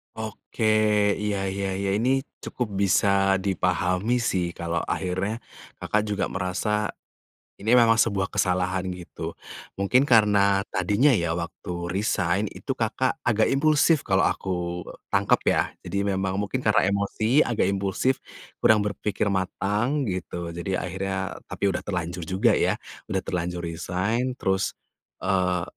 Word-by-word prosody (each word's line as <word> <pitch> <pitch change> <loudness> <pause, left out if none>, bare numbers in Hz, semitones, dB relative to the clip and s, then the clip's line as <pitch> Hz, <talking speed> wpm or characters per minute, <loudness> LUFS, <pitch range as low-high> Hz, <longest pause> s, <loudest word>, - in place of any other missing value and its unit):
Oke, 110 +1 -6 0.6
iya 105 -1 -1
iya 100 0 -2
iya, 100 0 -1
ini 120 +4 +1 0.3
cukup 125 - -3
bisa 95 +1 +3
dipahami 90 +3 +1
sih, 85 -2 -1
kalau 85 0 -2
akhirnya 95 +5 -2 0.4
Kakak 105 - +1
juga 105 -1 0
merasa 100 +3 -1 0.6
ini 110 +3 -2
memang 120 -2 +6
sebuah 100 -4 +2
kesalahan 95 -1 0
gitu. 90 -1 -7 0.5
Mungkin 125 +7 +4
karena 105 -6 +4
tadinya 100 +8 +2
ya 85 -4 0
waktu 85 +1 -5
resign 95 +1 0
itu 135 - -4
Kakak 120 +2 0
agak 110 -2 +3
impulsif 150 +2 +3
kalau 95 -2 +3
aku 90 -2 -3 0.2
tangkap - - +2
ya, - - +2
jadi 100 0 -2
memang 95 0 -1
mungkin 105 +6 -2
karena 105 -5 +3
emosi 110 +6 +1
agak 120 -5 +1
impulsif, 100 +7 0 0.4
kurang 105 -2 +4
berpikir 105 0 -1
matang 105 +8 0
gitu, 90 -5 -4
jadi 90 +2 -3
akhirnya 95 +1 -3 0.3
tapi - - -7
udah 90 - -2
terlanjur 90 -2 -3
juga 95 +6 +3
ya, - - +2 0.3
udah 95 - -1
terlanjur 90 -1 -3
resign 100 +9 -1
terus, 95 -6 -1 0.5
eee, 90 -2 +1
100 Hz, 130 wpm, -25 LUFS, 90-110 Hz, 0.6 s, memang